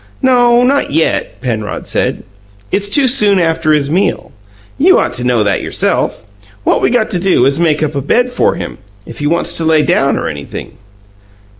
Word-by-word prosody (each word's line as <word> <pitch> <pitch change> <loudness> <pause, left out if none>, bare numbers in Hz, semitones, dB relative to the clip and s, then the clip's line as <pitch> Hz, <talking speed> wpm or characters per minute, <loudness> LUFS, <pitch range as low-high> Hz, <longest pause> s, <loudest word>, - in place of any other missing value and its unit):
"No; 245 -2 +4
not 275 +3 +1
yet," 160 +3 -1
Penrod 110 -5 -4
said. - - -2 0.5
"It's 205 0 0
too 270 +5 +3
soon 210 -6 +4
after 165 -2 0
his 145 -2 +1
meal. 185 +2 -1 0.5
You 365 +7 +5
ought - - 0
to 120 0 -3
know 125 -3 +1
that 100 -2 0
yourself. - - -1 0.4
What - - +1
we - - +2
got 240 -2 0
to 180 - 0
do 180 -9 +2
is 140 +1 +1
to - - -2
make 155 -2 +1
up 155 -1 -2
a 140 - -2
bed 245 - 0
for 245 - +1
him - - -7 0.3
if 115 - -10
he 145 - -1
wants 170 +3 0
to 165 - -2
lay 160 -1 +3
down - - +1
or - - -3
anything." 70 -1 -8
165 Hz, 195 wpm, -13 LUFS, -, 0.5 s, You